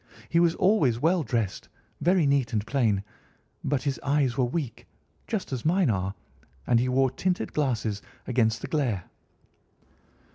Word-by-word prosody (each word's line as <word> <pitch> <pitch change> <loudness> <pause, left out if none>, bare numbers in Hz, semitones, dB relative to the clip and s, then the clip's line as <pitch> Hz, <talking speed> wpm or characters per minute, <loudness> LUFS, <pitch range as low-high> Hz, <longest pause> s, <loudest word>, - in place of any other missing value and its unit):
He 170 - +3
was 170 -1 +3
always 155 - +3
well 170 +5 +3
dressed, 115 -7 -2 0.3
very 175 -2 +3
neat 140 -4 +1
and 105 -1 0
plain, 110 -8 +1 0.6
but 140 -3 0
his 140 -2 -1
eyes 140 -3 +1
were 130 -2 +2
weak, 130 -2 -4 0.4
just 200 -10 -3
as 125 - -3
mine 170 -3 +3
are, 95 0 -2 0.5
and 120 -1 +3
he 125 +2 +1
wore 130 0 +3
tinted 180 +7 -1
glasses 115 -8 -1 0.2
against 115 -3 +1
the - - -4
glare." 125 - 0
130 Hz, 150 wpm, -27 LUFS, 115-155 Hz, 0.6 s, He